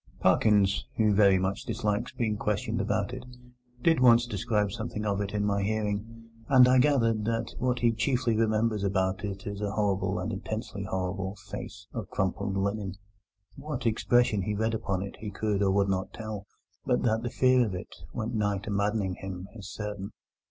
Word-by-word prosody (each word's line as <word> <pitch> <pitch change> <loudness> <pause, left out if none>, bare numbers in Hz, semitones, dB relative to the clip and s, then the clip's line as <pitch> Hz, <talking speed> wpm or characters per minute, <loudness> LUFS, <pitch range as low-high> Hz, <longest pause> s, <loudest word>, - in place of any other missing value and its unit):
Parkins, 100 -2 +3
who 110 -2 +4
very 100 -2 +5
much 95 +1 -1
dislikes 105 0 -1
being 110 -3 -1
questioned 105 -1 -1
about 100 +6 -1
it, 125 -1 -6 0.6
did 165 -3 +4
once 120 -1 +6
describe 110 -4 0
something 110 0 -4
of 100 -1 0
it 100 0 -3
in 105 -1 0
my 100 -1 +1
hearing, 110 +2 -2 0.2
and 130 -2 +8
I 130 0 +5
gathered 115 -6 +3
that 115 0 -1
what 125 0 +1
he 120 -1 +3
chiefly 120 +1 +1
remembers 110 -1 +1
about 95 0 0
it 100 +1 -5
is 100 -1 -5
a 105 - -1
horrible, 100 -2 0
an - - -2
intensely - - -4
horrible, 95 +1 -3
face 105 0 -8
of 110 -6 -5
crumpled 95 0 -1
linen. 100 -1 -1 0.6
What 140 -2 -5
expression 115 -1 +3
he 105 +3 -2
read 110 +2 0
upon 95 -4 -1
it 100 - -8
he 105 - -5
could 105 0 -1
not 100 - +3
or - - +3
would 100 0 +3
not 95 0 -1
tell, 110 -3 -6 0.4
but - - +1
that 110 -1 +2
the 120 - -3
fear 130 +1 +4
of 105 -5 -2
it 90 - -7 0.2
went 115 0 -3
nigh 105 -2 +1
to 100 +2 -6
maddening 100 -2 0
him 95 -1 -6
is 100 -3 -9
certain. 105 -2 -5
105 Hz, 185 wpm, -28 LUFS, 100-115 Hz, 0.6 s, and